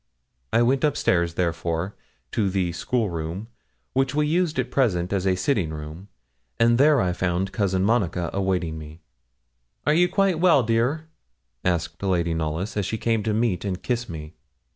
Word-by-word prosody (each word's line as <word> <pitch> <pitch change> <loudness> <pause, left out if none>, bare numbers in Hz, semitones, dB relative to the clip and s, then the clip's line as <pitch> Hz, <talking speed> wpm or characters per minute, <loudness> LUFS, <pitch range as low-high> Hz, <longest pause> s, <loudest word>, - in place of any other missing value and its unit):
I 115 - +4
went 130 +4 +2
up 150 -2 +2
stairs, 85 -2 +1
therefore, 85 +1 -1 0.4
to 105 -4 +1
the 95 -2 0
'school 105 +4 -1
room,' 85 +7 -5 0.4
which 135 +1 +1
we 150 0 +2
used 165 0 +1
at 125 -1 -1
present 95 -9 +1
as 95 -1 0
a 95 - +3
sitting 95 - 0
room, 80 +4 -8 0.5
and 115 +1 +4
there 145 0 +5
I 90 -4 +1
found 90 +2 -1
Cousin 95 -2 0
Monica 90 -6 +1
awaiting 90 -5 -1
me. 80 +2 -11 0.8
'Are 150 - +4
you 175 +2 +4
quite 195 -4 +2
well, 170 -7 +5
dear?' 120 +8 0 0.6
asked 85 -2 -1
Lady 85 -4 +1
Knollys, 80 +5 -2
as 105 -2 0
she 110 - -2
came 115 -1 0
to 110 +1 -1
meet 110 -5 0
and 95 -2 -3
kiss 120 -2 -2
me. 80 -1 -7
95 Hz, 170 wpm, -24 LUFS, 85-120 Hz, 0.8 s, there